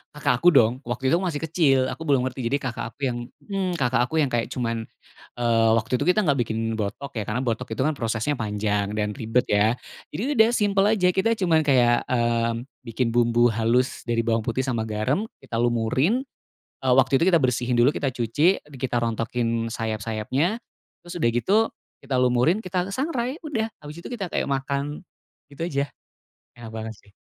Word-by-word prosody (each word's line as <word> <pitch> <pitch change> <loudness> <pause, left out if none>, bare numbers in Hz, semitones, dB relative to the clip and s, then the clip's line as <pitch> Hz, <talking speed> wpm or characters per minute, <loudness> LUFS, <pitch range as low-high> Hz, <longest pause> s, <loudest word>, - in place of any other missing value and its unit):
Kakak 125 -4 +1
aku 175 - +2
dong, 120 +1 +4
waktu 130 +3 -1
itu - - +3
aku 190 - -2
masih 150 0 -4
kecil, 155 -5 +3
aku - - -8
belum 135 -3 +3
ngerti. 130 +1 -5
Jadi 140 - +2
kakak 120 -2 -4
aku - - -26
yang, 120 -2 -1 0.3
mmm, 195 -3 -2
kakak 125 -4 +2
aku 155 - -6
yang 140 -3 0
kayak 120 -1 0
cuman. 115 -2 -3 0.5
Eee, 115 -2 +3
waktu 120 +3 -1
itu, 145 - -1
kita 205 +4 +4
nggak 140 -4 +2
bikin 110 0 -2 0.2
botok, 110 +7 -4
ya. 105 - -2
Karena 120 +4 -1
botok 125 +1 -2
itu - - -2
kan 155 - +2
prosesnya 115 +2 -1
panjang 105 -1 -1
dan 105 0 0
ribet, 115 +4 0
ya. 105 +3 +3 0.3
Jadi 150 - -5 0.2
udah, 220 +1 +6
simpel 200 -1 +2
aja, 180 -3 +3
kita 225 +5 +2
cuma 170 -4 +3
kayak, 125 -5 +3
mmm, 115 -1 +1 0.2
bikin 115 +1 -1
bumbu 120 0 +3
halus 115 +3 +1
dari 115 -1 +1
bawang 115 -1 +1
putih 125 +3 0
sama 115 -4 -2
garam, 125 - -1 0.2
kita 115 - -3
lumurin. 120 - +1 0.6
Eee, 130 -1 +4
waktu 135 0 +4
itu 180 - +4
kita 170 - +5
bersihin 125 -2 0
dulu, 130 +5 +5
kita 140 - 0
cuci, 135 - +2 0.2
kita 125 -2 0
rontokin 115 0 -1
sayap-sayapnya, 115 - -1 0.5
terus 175 - -8
udah 115 - +4
gitu 155 - +2 0.5
kita 135 -1 -1
lumurin, 125 - +3
kita 185 +1 -1
sangrai. 260 +1 -2
Udah, 225 -7 -2
abis 150 +3 -9
itu - - -7
kita 205 -7 -3
kayak - - -1
makan 140 +2 -2 0.5
gitu 145 +3 -7
aja. 140 -2 0 0.7
Enak 115 -2 -9
banget 110 0 -5
sih. 100 - -23
125 Hz, 185 wpm, -24 LUFS, 115-155 Hz, 0.7 s, udah